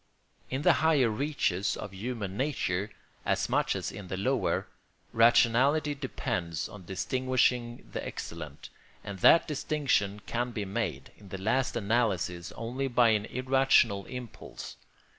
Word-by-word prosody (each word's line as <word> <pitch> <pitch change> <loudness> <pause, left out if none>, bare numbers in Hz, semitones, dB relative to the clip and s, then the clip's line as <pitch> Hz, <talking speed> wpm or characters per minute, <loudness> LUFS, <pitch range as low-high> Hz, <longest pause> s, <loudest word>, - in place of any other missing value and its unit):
In 135 +3 -2
the - - +6
higher 150 -7 +4
reaches 105 -7 0
of 100 - -7
human 105 -1 -4
nature, 105 -7 -1 0.3
as - - 0
much - - +1
as - - -3
in 100 -3 -9
the 95 - -4
lower, 130 +6 0 0.5
rationality 125 +6 +4
depends 90 - -3
on 100 -4 -12
distinguishing 125 +4 0
the - - -4
excellent; - - -7 0.3
and 100 -2 -7
that 165 - +6
distinction 135 -9 0
can 120 +1 -1
be 105 -3 -3
made, 95 +1 -3
in 100 -2 -14
the 95 - -5
last 115 +7 0
analysis, 100 -7 0
only 125 +4 -3
by 120 -2 +4
an 105 -1 +2
irrational 130 -6 +2
impulse. 125 -3 -8
115 Hz, 135 wpm, -29 LUFS, 100-130 Hz, 0.5 s, the